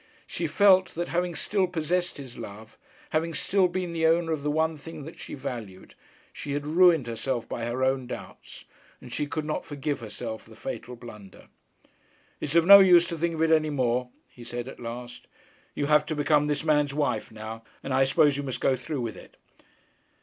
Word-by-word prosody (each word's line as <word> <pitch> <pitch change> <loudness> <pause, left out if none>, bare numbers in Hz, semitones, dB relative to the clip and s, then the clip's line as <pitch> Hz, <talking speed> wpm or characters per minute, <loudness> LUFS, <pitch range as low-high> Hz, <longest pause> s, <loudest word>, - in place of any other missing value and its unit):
She - - -3
felt 190 -2 +4
that 175 +1 -3
having 175 0 -1
still 190 +4 0
possessed 175 +1 -1
his 130 -4 -9
love, 110 0 -10 0.4
having 165 0 0
still 190 +4 +2
been 180 -1 -3
the 160 -1 +2
owner 165 0 +2
of 155 -3 -1
the 150 - -1
one 160 +2 +1
thing 155 0 -9
that 160 - -10
she - - -7
valued, 115 -9 -7 0.4
she 140 - -5
had 145 0 -2
ruined 165 -2 +5
herself 120 +1 -3
by 115 - -4
her 120 +2 -2
own 130 -1 +1
doubts; - - -9 0.3
and - - -11
she 150 - -1
could 155 +1 -3
not 155 - -2
forgive 145 0 -3
herself 110 0 -6
the - - -16
fatal 125 - -6
blunder. 105 -5 -13 0.9
'It - - -4
is 150 - -3
of 170 -1 +5
no 200 +2 +11
use 180 -3 +7
to 170 - -4
think 170 0 0
of 160 - 0
it 165 - +2
any 155 -1 +4
more,' 125 -3 0 0.2
he 120 - -14
said 120 +1 -5
at - - -9
last. 120 +1 -8 0.5
'You 145 - -1
have 150 0 +3
to 155 - -2
become 150 0 +2
this 150 +1 -1
man's 150 -3 +2
wife 145 -8 -1
now, 110 +1 -8 0.2
and 135 - -3
I 135 +1 +4
suppose 140 +1 +3
you - - -2
must 130 -3 -4
go 135 - +2
through 130 +2 -4
with 115 -4 -4
it.' - - -14
145 Hz, 205 wpm, -27 LUFS, 125-165 Hz, 0.9 s, no